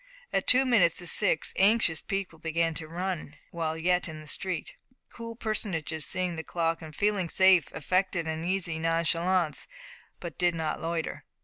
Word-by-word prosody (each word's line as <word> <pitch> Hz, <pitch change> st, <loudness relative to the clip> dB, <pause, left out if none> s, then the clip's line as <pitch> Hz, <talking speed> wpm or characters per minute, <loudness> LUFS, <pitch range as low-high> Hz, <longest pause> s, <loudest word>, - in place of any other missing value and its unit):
At -, -, 0 dB
two 260 Hz, +1 st, +6 dB
minutes 190 Hz, -10 st, +4 dB
to 175 Hz, -, -5 dB
six 160 Hz, -, +2 dB
anxious 195 Hz, -5 st, +4 dB
people 195 Hz, -5 st, -4 dB
began 165 Hz, 0 st, 0 dB
to 155 Hz, 0 st, -5 dB
run 170 Hz, -2 st, -4 dB, 0.2 s
while 160 Hz, -2 st, -2 dB
yet 180 Hz, +2 st, +1 dB
in 155 Hz, -1 st, -7 dB
the 155 Hz, -, -11 dB
street. 185 Hz, +4 st, -3 dB, 0.4 s
Cool 230 Hz, -1 st, -8 dB
personages, 185 Hz, -9 st, -2 dB
seeing 180 Hz, -2 st, -2 dB
the 160 Hz, -, -4 dB
clock, 165 Hz, -1 st, -1 dB
and 155 Hz, -2 st, -10 dB
feeling 200 Hz, -3 st, +1 dB
safe, 190 Hz, -2 st, +5 dB
affected 185 Hz, 0 st, 0 dB
an 160 Hz, 0 st, -3 dB
easy 175 Hz, -3 st, -1 dB
nonchalance, 165 Hz, +1 st, +1 dB, 0.5 s
but 170 Hz, -4 st, -8 dB
did 175 Hz, -1 st, +3 dB
not 160 Hz, -2 st, -2 dB
loiter. 165 Hz, 0 st, -3 dB
170 Hz, 165 wpm, -28 LUFS, 160-190 Hz, 0.5 s, two